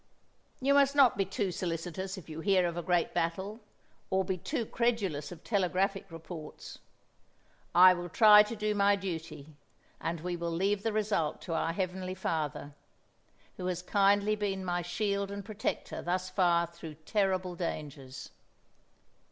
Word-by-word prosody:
"You 275 +2 +2
must 280 0 +4
not 270 -4 +6
be 195 - +1
too 195 0 -2
solicitous 180 +2 -4
if 185 - -10
you 160 0 -7
hear 185 0 +3
of 170 - -4
a 175 - -2
great 175 0 +1
battle, 190 +6 -2 0.5
or 190 0 +1
be 190 0 -1
too 235 - -3
credulous 205 -12 -1
of 170 -2 -10
telegraphic 195 -1 0
reports. 165 -1 -9 1.0
I 185 +1 +9
will 175 0 -5
try 210 +2 +8
to 210 +2 -2
do 210 0 -1
my 200 0 +4
duty, 160 -6 -6 0.5
and 165 -1 -3
we 175 +1 -3
will 170 0 -3
leave 195 +4 0
the 225 - -1
result 205 -8 0
to 170 - -4
our 165 0 0
Heavenly 185 +1 -3
Father, 150 -5 -3 0.8
who 180 - -4
has 180 -1 -2
kindly 205 +2 +3
been 195 -2 -2
my 175 -1 -1
shield 200 +3 -1
and 200 -1 -6
protector 215 -1 -3
thus 185 +1 -2
far 175 -3 +3
through 170 -2 -10
terrible 185 +2 -1
dangers." 145 -6 -6
185 Hz, 155 wpm, -31 LUFS, 170-200 Hz, 1.0 s, I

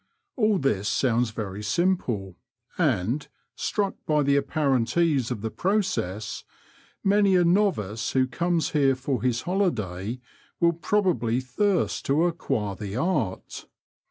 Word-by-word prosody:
All 215 -5 +2
this 105 - 0
sounds 120 -2 +1
very 105 -2 -5
simple, 110 - 0 0.4
and, 115 +11 0 0.3
struck 200 -2 -1
by 150 -1 +3
the 140 0 +3
apparent 140 -3 +1
ease 150 -8 +2
of 120 -5 -4
the 110 0 -3
process, 185 - -1 0.6
mauy 200 -1 +4
a 175 - +3
novice 170 - +1
who 130 -1 +3
comes 170 +5 -1
here 135 -3 +3
for 130 0 -2
his 125 -1 0
holiday 120 - -1 0.4
will 170 0 +4
probably 165 - +1
thirst 180 +10 0
to 145 +4 +3
acquire 115 - -1
the 100 0 -6
art. 130 - -2
135 Hz, 130 wpm, -26 LUFS, 110-175 Hz, 0.6 s, mauy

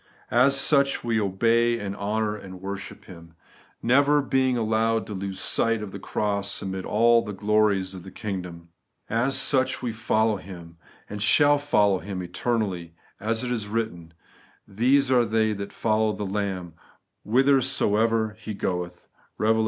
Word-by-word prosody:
As 135 +3 +4
such, 140 -1 +3
we 115 -2 0
obey 115 +4 +2
and 100 -2 -5
honour 105 +1 -1
and 95 -3 -10
worship 95 +1 -7
Him; 85 -2 -14 0.5
never 140 +5 +4
being 130 -2 +1
allowed 110 0 +1
to 105 - -7
lose 95 0 -5
sight 115 -2 +1
of 100 - -7
the 100 - -8
cross 100 0 -2
amid 95 -1 -4
all 115 +2 +4
the 105 -2 -6
glories 100 -2 +1
of 95 - -8
the 95 - -11
kingdom, 90 -5 -6 0.4
A& 115 +4 +1
such 130 -1 +1
we 120 - -1
foUow 110 -1 +1
Him, 85 -3 -11 0.3
and 105 0 -7
shall 145 +6 +4
follow 105 -9 +2
Him 95 -2 -6
eternally, 90 -3 -3 0.2
as 110 +3 -1
it 125 - -3
is 110 -4 -2
written, 95 -7 -4 0.5
'These 130 +6 +2
are 125 -2 +5
they 110 -1 +1
that 100 -1 -6
follow 110 -1 0
the 105 +1 -5
Lamb 95 -4 -3 0.5
whitherso 125 -3 +2
ever 110 -2 0
He 110 -1 -6
goeth' 90 -2 -4 0.3
(Eev, 110 +1 +3
xiv. 110 - 0
105 Hz, 160 wpm, -25 LUFS, 95-115 Hz, 0.5 s, are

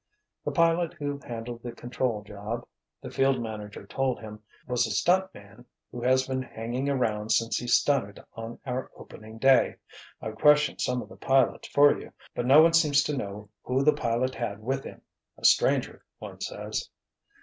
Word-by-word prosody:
"The - - -2
pilot 165 0 +2
who 145 -1 -4
handled 115 0 -6
the 120 - -6
control 120 -2 -2
job," 105 +3 -6 0.4
the - - -7
field 135 -1 +2
manager 105 -3 -7
told 130 +4 -1
him, 105 -1 -9 0.3
"was 125 -2 +1
a - - -6
stunt 180 - +2
man 100 +4 -14 0.3
who 120 - -7
has 130 +2 +3
been 130 0 -1
hanging 125 +2 -4
around 110 -6 -1
since 115 +1 +2
he 120 - -4
stunted 120 -5 +2
on 115 +1 -7
our 130 0 -3
opening 110 +1 -12
day. 135 +2 +4 0.4
I've 110 0 -6
questioned 150 +3 +4
some 125 -1 0
of - - -15
the - - -13
pilots 135 -1 +2
for 145 0 +5
you, - - -12 0.2
but 120 - -2
no 145 +4 +8
one 165 0 +4
seems 150 -4 +4
to 150 - -2
know 105 -4 -6
who 130 +2 0
the 150 - +5
pilot 120 +2 -1
had 110 -4 -4
with 135 +3 -2
him. - - -10 0.3
A - - -7
stranger, - - +3
one - - -10
says." - - -4
125 Hz, 180 wpm, -27 LUFS, 110-135 Hz, 0.4 s, no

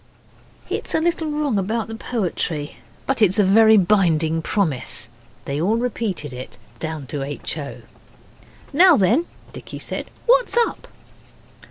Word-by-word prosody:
It - - -3
is - - +1
a - - +3
little 325 -1 0
wrong 295 -8 0
about 220 +4 -2
the 225 - -7
poetry, 180 -10 -3 0.3
but 270 -3 -1
it 210 - +8
is 190 - -4
a 210 - +5
very 220 +3 +6
binding 170 -5 +2
promise. 160 - -1 0.4
They 140 +2 -2
all 205 +6 +2
repeated 215 - -3
it, 125 +1 -9 0.2
down 160 -3 -4
to 140 +2 -4
H. 140 +2 -4
O. 140 -1 -8 0.9
'Now 345 +2 +7
then,' 235 - +2 0.3
Dicky - - -8
said, - - -5 0.2
'what's - - +3
up? 470 - 0
205 Hz, 150 wpm, -21 LUFS, 160-250 Hz, 0.9 s, it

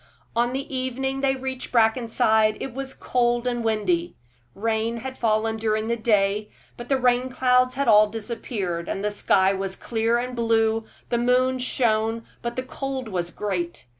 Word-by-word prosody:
On 240 +1 +2
the 270 +1 -4
evening 265 +1 -2
they 270 -1 +2
reached 260 -1 -5
Brackenside 220 -2 +3
it 265 - -5
was 270 +1 -6
cold 240 -1 0
and 240 -1 -1
windy. 335 +11 0 0.4
Rain 225 +2 -1
had 260 +2 -6
fallen 220 -1 +1
during 220 0 -1
the 235 - +2
day, 210 -2 +1 0.3
but 240 0 -9
the 270 - +3
rain 250 0 +2
clouds 255 0 +2
had 280 0 -1
all 215 -1 +7
disappeared; 210 -5 -4
the 210 +2 -2
sky 195 -1 +3
was 195 0 -3
clear 230 0 0
and 250 +1 -3
blue, 225 -1 +1 0.2
the 235 - +1
moon 255 +1 +2
shone, 225 -2 0 0.2
but 235 0 -4
the 255 - -2
cold 265 -2 -4
was 175 -3 -2
great. 175 -6 -4
235 Hz, 165 wpm, -24 LUFS, 215-255 Hz, 0.4 s, all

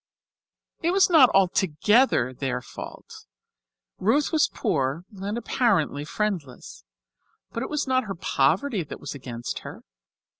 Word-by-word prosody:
This 335 - +1
was 385 0 +4
not 290 -7 +7
altogether 190 - +3
their 125 -1 -2
fault. 125 - -11 0.7
Ruth 270 +9 +2
was 315 -3 +3
poor 140 +4 -1
and 200 +3 -4
apparently 170 - 0
friendless, 165 - -4 0.7
but 230 - -4
it - - -4
was 300 -1 -1
not 260 -1 +1
her 195 -2 -5
poverty 185 - +1
that 150 - -9
was - - -6
against 120 -4 -6
her. - - -10
195 Hz, 125 wpm, -25 LUFS, -, 0.7 s, not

